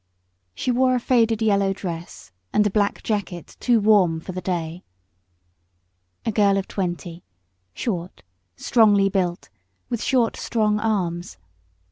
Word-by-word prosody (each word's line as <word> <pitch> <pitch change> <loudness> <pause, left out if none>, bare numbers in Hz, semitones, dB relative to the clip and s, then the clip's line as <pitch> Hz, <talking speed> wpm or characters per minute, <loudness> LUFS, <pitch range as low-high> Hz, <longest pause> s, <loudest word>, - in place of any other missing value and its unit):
She 255 - -1
wore 255 +1 +3
a - - +1
faded 230 -3 +2
yellow 200 -2 +2
dress 175 -3 -7 0.2
and 210 - +3
a 210 - +1
black 205 0 0
jacket 190 -6 -4
too 240 -2 +3
warm 200 -6 +4
for 175 - -8
the 185 0 -5
day. 175 -1 -3 1.4
A 225 - +1
girl 200 -2 +3
of 195 - -2
twenty, 175 -2 -4 0.5
short, 180 - -4 0.3
strongly 205 - +4
built, 185 -3 -2 0.4
with 235 -2 -2
short, 245 -4 +1
strong 210 -2 0
arms. 180 - -2
200 Hz, 130 wpm, -23 LUFS, 175-220 Hz, 1.4 s, warm